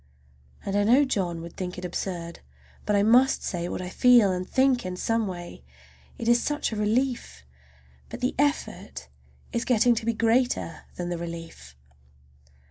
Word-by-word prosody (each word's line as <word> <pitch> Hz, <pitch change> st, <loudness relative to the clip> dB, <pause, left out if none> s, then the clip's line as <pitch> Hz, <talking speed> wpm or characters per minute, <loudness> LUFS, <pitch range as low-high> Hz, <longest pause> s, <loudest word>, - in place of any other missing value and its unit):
And 195 Hz, -, -2 dB
I 205 Hz, -, +3 dB
know 250 Hz, +7 st, +5 dB
John 180 Hz, -9 st, -2 dB
would 170 Hz, 0 st, -10 dB
think 180 Hz, -1 st, -5 dB
it 180 Hz, -, -6 dB
absurd. 175 Hz, -1 st, -5 dB, 0.5 s
But 210 Hz, -, +2 dB
I 200 Hz, -, +3 dB
must 245 Hz, +5 st, +4 dB
say 175 Hz, -1 st, -3 dB
what -, -, -4 dB
I 180 Hz, -, -5 dB
feel 240 Hz, -1 st, +5 dB
and 185 Hz, 0 st, -3 dB
think 260 Hz, -2 st, +2 dB
in 185 Hz, 0 st, -4 dB
some 225 Hz, +2 st, 0 dB
way—it 65 Hz, -, -10 dB
is 240 Hz, 0 st, +4 dB
such 295 Hz, -3 st, -1 dB
a -, -, -3 dB
relief! 215 Hz, -, -1 dB, 0.6 s
But -, -, -7 dB
the 250 Hz, -, 0 dB
effort 290 Hz, +1 st, -2 dB, 0.4 s
is 235 Hz, -1 st, 0 dB
getting 245 Hz, 0 st, +4 dB
to 225 Hz, -1 st, -3 dB
be 230 Hz, -, +2 dB
greater 230 Hz, -3 st, 0 dB
than 175 Hz, -1 st, -4 dB
the 175 Hz, -1 st, -3 dB
relief. 165 Hz, -, -8 dB
205 Hz, 165 wpm, -26 LUFS, 175-240 Hz, 0.6 s, know